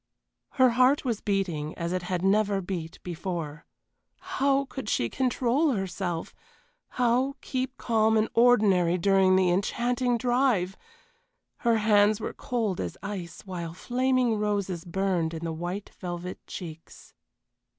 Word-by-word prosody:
Her 260 -2 +5
heart 255 +4 +3
was 230 -5 -1
beating 175 -7 -1
as 170 +1 -2
it 185 - -1
had 180 0 -3
never 200 0 +2
beat 175 -3 -5
before. 170 -3 -5 0.5
How 280 -7 +1
could 265 -5 -6
she 115 - +1
control 260 +3 +1
herself! 185 -4 -3 0.6
How 250 +3 +2
keep 260 0 -3
calm 220 -1 +2
and 215 0 +2
ordinary 205 -8 +4
during 190 0 +4
the 185 -1 +3
enchanting 240 +6 0
drive! 240 -7 +1 0.8
Her 235 -1 +2
hands 210 -1 +4
were - - -4
cold 230 -9 -2
as - - -5
ice, 195 -4 -6
while 170 -4 -6
flaming 250 0 +1
roses 200 -5 -1
burned 175 -2 -1
in 160 - -6
the 165 - -2
white 175 +5 -5
velvet 180 0 -5
cheeks. 165 -3 -9
200 Hz, 130 wpm, -27 LUFS, 180-245 Hz, 0.8 s, Her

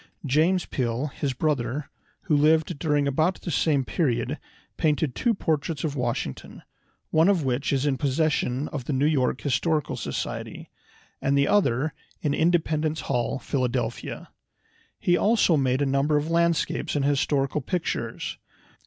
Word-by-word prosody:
James 160 +6 +2
Peale, 125 +2 -2
his 140 -3 -2
brother, 140 0 -1 0.3
who 155 - +1
lived 155 +1 +3
during 150 -3 +1
about 155 +7 +1
the 175 - -3
same 145 -3 +2
period, 130 -3 -1 0.4
painted 150 -3 +1
two 235 - +1
portraits 155 -4 -1
of 150 -3 -2
Washington, 120 - -4 0.5
one 160 +4 +4
of 185 -6 +2
which 130 +1 0
is 140 0 +1
in 135 -3 0
possession 140 -1 0
of 135 -5 -5
the 145 - -2
New 135 +2 +2
York 135 -4 +1
Historical 150 +3 0
Society, - - -5 0.5
and 140 +1 +2
the 140 - +3
other 145 -7 +2 0.3
in 145 - 0
Independence 160 -1 +1
Hall, 125 -1 -1
Philadelphia. 130 -3 -3 0.7
He 175 - +2
also 205 -3 +3
made 135 -1 +1
a - - +2
number 140 +2 +2
of 150 +3 -2
landscapes 170 -2 +1
and 140 -2 +1
historical 140 0 +1
pictures. 175 +6 -3
145 Hz, 145 wpm, -25 LUFS, 135-160 Hz, 0.7 s, one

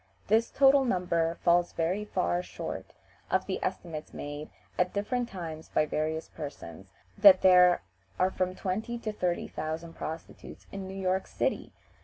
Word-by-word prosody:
This 225 +2 +3
total 275 0 +5
number 170 -7 0
falls 175 0 +3
very 180 +6 -1
far 85 - 0
short - - -7 0.3
of - - +1
the - - -3
estimates 155 -3 -4
made 145 +1 -6 0.3
at 180 0 +1
different 240 +4 -1
times 160 -4 -7
by 155 - +2
various 155 +1 -2
persons, 95 - -9 0.3
that 195 -2 +8
there 180 -1 +6 0.3
are 185 +1 +2
from 185 0 -1
twenty 220 +7 -3
to 225 -2 -4
thirty 180 -4 -1
thousand 160 +2 -5
prostitutes 160 0 -8
in 195 -1 -6
New 190 0 -6
York 190 0 0
City! - - -2
180 Hz, 150 wpm, -29 LUFS, 160-195 Hz, 0.3 s, that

